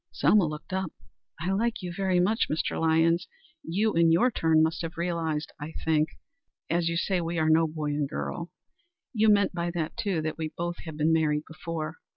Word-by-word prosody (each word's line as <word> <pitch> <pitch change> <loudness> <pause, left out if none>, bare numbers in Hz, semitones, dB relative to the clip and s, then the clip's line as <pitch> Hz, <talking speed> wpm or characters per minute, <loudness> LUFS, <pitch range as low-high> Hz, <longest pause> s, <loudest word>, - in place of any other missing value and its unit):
Selma 205 -6 +4
looked 150 +4 -7
up. 190 -3 -1 0.5
"I 175 +5 -1
like 220 +1 0
you 175 -1 -4
very 190 -2 +1
much, 210 +6 +2
Mr. 155 - -1
Lyons. 165 +1 +3 0.3
You, 205 +6 0
in 165 0 +4
your 215 +10 +4
turn, 160 -5 +3
must 160 +2 0
have 165 0 -6
realized 165 -3 -1
that, - - -6
I 160 +2 -7
think. 155 -1 +2 0.6
As 170 0 +2
you 170 - -1
say, 185 +1 0
we 170 +1 -3
are 160 0 +3
no 160 +1 +4
boy 155 -1 -3
and 145 -1 -1
girl. 170 +3 -4 0.6
You 220 -1 +4
meant 200 -2 +4
by 170 0 -2
that, 160 -2 -2
too, 200 -8 -1
that 155 +1 -3
we 155 -1 -3
both 175 0 -2
have 160 -2 -7
been 155 +1 +3
married 150 -2 +2
before. 160 -1 -5
165 Hz, 200 wpm, -27 LUFS, 160-180 Hz, 0.6 s, Selma